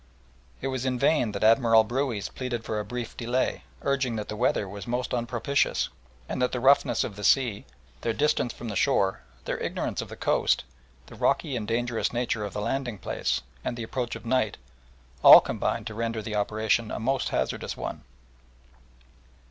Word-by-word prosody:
It 135 - -2
was 130 -2 -3
in 130 -1 0
vain 135 -4 +2
that 100 - -3
Admiral 115 0 +6
Brueys 120 -2 -2
pleaded 125 -3 -4
for 110 - -2
a - - -2
brief 120 +2 -5
delay, 125 +2 -1 0.2
urging 135 -4 0
that 105 -1 -4
the 105 - -4
weather 110 -3 +1
was 100 +2 -8
most 125 +1 -2
unpropitious, 120 +3 0 0.4
and - - -3
that 125 - +2
the 125 - -2
roughness 135 +3 +4
of 105 - -5
the 105 - -8
sea, 120 -4 +2 0.4
their 115 - 0
distance 145 -1 +1
from 120 - -7
the 100 - -4
shore, 95 - +2 0.2
their - - -2
ignorance - - -2
of - - -8
the - - -8
coast, - - +1 0.4
the - - -14
rocky 135 - 0
and 110 -3 -3
dangerous 120 0 0
nature 120 -3 -1
of 100 - -5
the 105 - -3
landing 125 0 -2
place, 90 - -2 0.2
and 120 - -3
the 115 - -4
approach 120 +1 -3
of - - -10
night, 115 -3 +1 0.7
all - - +12
combined 115 - -2
to 110 - -5
render 115 0 -2
the 105 0 -4
operation 110 +2 +1
a - - -4
most 130 +4 0
hazardous - - -2
one. - - -5
115 Hz, 185 wpm, -27 LUFS, 110-125 Hz, 0.7 s, all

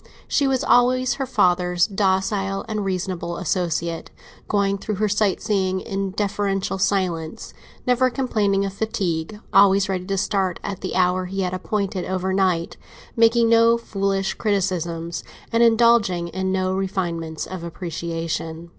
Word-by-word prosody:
She 280 - +2
was 265 -1 +1
always 255 +1 +3
her 265 - -1
father's 180 -3 +2
docile 195 -1 0
and 215 -2 -2
reasonable 185 -2 -3
associate—going 180 +3 -2
through 210 +1 -3
their 210 +2 +1
sight 205 -1 +1
seeing 190 -3 0
in 195 0 -3
deferential 195 -1 -1
silence, 180 -5 -1 0.3
never 250 +1 +3
complaining 210 -7 0
of 195 - -4
fatigue, 195 -3 -2
always 195 0 +5
ready 185 -1 -2
to 195 -1 -1
start 190 -2 0
at 200 -2 -5
the 185 - -4
hour 185 0 +2
he 195 +2 -3
had 180 -1 -1
appointed 195 0 -2
over 190 0 -1
night, 185 -3 0 0.4
making 230 0 +4
no 230 0 +5
foolish 195 -3 -1
criticisms 175 -5 -2 0.3
and 230 - +3
indulging 225 -7 +4
in 190 +2 -2
no 185 0 0
refinements 175 -4 -3
of 185 -2 -7
appreciation. 165 -1 -4
195 Hz, 135 wpm, -22 LUFS, 180-210 Hz, 0.4 s, always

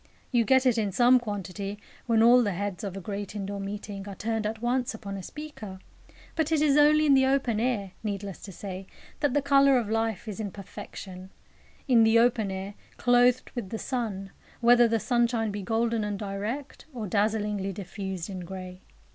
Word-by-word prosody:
You 240 -3 +3
get 260 +1 +4
it 245 -3 +3
in 205 -2 0
some 245 +5 +5
quantity 205 -2 -5 0.3
when 225 -1 +4
all 245 +2 +7
the 205 -5 0
heads 195 0 -4
of 195 -2 -4
a - - -3
great 200 +2 -5
indoor 200 0 -4
meeting 200 0 -6
are 195 - -7
turned 220 0 -2
at 220 +1 -4
once 245 0 0
upon 200 -2 -7
a 195 - -5
speaker; 225 -7 -8 0.6
but 320 -1 0
it 320 - +3
is 295 -2 +3
only 300 +1 +5
in 285 - +5
the 265 -1 +5
open 265 -5 +1
air, 220 -5 -1
needless 200 -2 -4
to 200 - -8
say, 190 +1 -7 0.3
that 290 -2 +1
the 290 - +2
colour 275 -1 +5
of 220 -3 -1
life 225 -1 -1
is 210 0 -5
in 210 -2 -3
perfection, 190 -1 -9 0.6
in 240 -4 +6
the 225 +1 +5
open 230 -3 +3
air, 190 +1 -5 0.2
"clothed 245 +1 +3
with 235 -7 -5
the 225 - -4
sun," 215 -7 -3 0.3
whether 240 0 +6
the 225 0 +1
sunshine 235 -2 +1
be 205 0 -4
golden 225 +2 0
and 205 -1 -2
direct, 210 +8 -5
or 225 -3 -4
dazzlingly 205 0 0
diffused 190 -2 -5
in 190 -3 -6
grey. 185 +1 -8
220 Hz, 190 wpm, -27 LUFS, 195-245 Hz, 0.6 s, all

